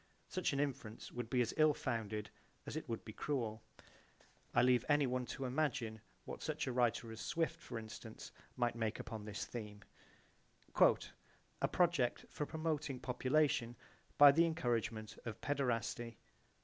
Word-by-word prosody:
Such 185 -2 0
an 140 - -1
inference 135 -6 -3
would 120 -2 -4
be 125 0 +3
as 115 - 0
ill 155 -1 +5
founded 110 -2 -2 0.3
as - - -5
it 155 -4 -4
would 115 - -3
be 110 - -7
cruel. 115 -6 -2 0.9
(I 120 - +4
leave 125 -1 +5
anyone 130 -4 +2
to 135 - -4
imagine 125 -5 -1 0.2
what - - -6
such - - -2
a - - -1
writer 120 -2 +1
as 110 - -7
Swift, 165 -1 -1
for - - -6
instance, 110 -1 -8 0.2
might 120 -1 +1
make 115 -2 -1
upon 110 -2 -6
this 105 -2 -4
theme, 105 -3 -7 0.9
"A - - +1
project 170 -9 +2
for 150 - -3
promoting 155 -4 -2
population 130 -1 +1 0.4
by 145 -1 +11
the 165 +4 +5
encouragement 115 -8 -1
of 115 -2 -5
paederasty." 120 -4 -1
125 Hz, 150 wpm, -37 LUFS, 115-145 Hz, 0.9 s, by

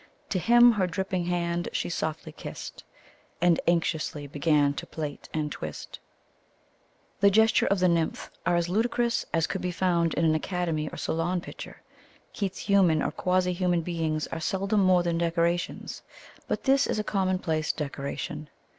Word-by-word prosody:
To 185 - 0
him 240 +6 +7
her 200 -5 +1
dripping 185 0 -2
hand 175 0 -1
she - - -1
softly 160 -1 -3
kist, - - -8 0.6
And 175 -1 +4
anxiously 160 -3 0
began 145 0 +2
to - - -7
plait 150 -2 -6
and 150 -2 -2
twist 75 - -7 1.2
The 200 - +6
gestures 220 +2 +4
of 200 - +3
the 185 - +5
nymph 170 -2 0
are 175 0 +2
as 170 0 +1
ludicrous 235 +4 0
as 165 -1 +2
could 190 - -4
be 180 - -1
found 170 -2 +1
in 165 - +1
an 160 - +4
Academy 160 -2 -1
or - - -9
Salon 170 +3 -1
picture. - - -10 0.5
Keats's 195 -3 -3
human 185 -6 +4
or - - -1
quasi 180 0 +1
human 175 -1 +1
beings 160 -3 -1
are 165 - -3
seldom 195 +5 0
more 185 -2 +4
than 170 -1 0
decorations, 170 +1 -1 0.5
but - - -2
this 275 0 +3
is - - -1
a 215 - 0
commonplace 185 -6 0
decoration. 150 +1 -5
175 Hz, 160 wpm, -27 LUFS, 160-185 Hz, 1.2 s, him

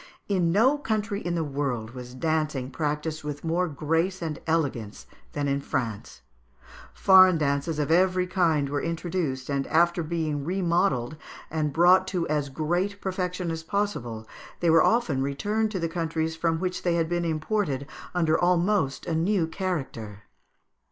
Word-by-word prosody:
In 180 -4 +1
no 255 - +4
country 215 -5 -2
in 175 0 -1
the 165 - 0
world 135 -6 -3
was 125 0 -9
dancing 150 -3 -1
practised 150 +1 -2
with 145 -1 -5
more 170 +2 +1
grace 165 +5 -1
and 160 -2 -4
elegance 135 -10 -1 0.3
than 145 -1 -1
in 140 0 0
France. 110 - -4 0.7
Foreign 185 -2 +6
dances 145 +1 0
of 150 0 -1
every 185 +1 +3
kind 165 -6 +1
were 145 0 -2
introduced, 165 -6 -2
and, 140 -1 -1
after 170 +1 +3
being 155 -3 -2
remodelled 170 -6 0 0.3
and 155 -2 0
brought 180 +4 +5
to 180 -3 -1
as 150 -2 0
great 175 +8 -1
perfection 180 -2 -2
as 165 0 -4
possible, 160 - -3 0.3
they 170 -2 +3
were 165 0 +6
often 200 - +2
returned 205 +11 0
to 200 -3 -3
the 165 - 0
countries 160 -1 -2
from 165 0 0
which 185 0 -2
they 175 -1 +1
had 165 -1 +1
been 175 +1 -1
imported 155 -3 -1 0.3
under 165 -3 +3
almost 175 -4 +1
a - - -2
new 170 +2 +2
character. 135 - -4
165 Hz, 155 wpm, -26 LUFS, 145-180 Hz, 0.7 s, Foreign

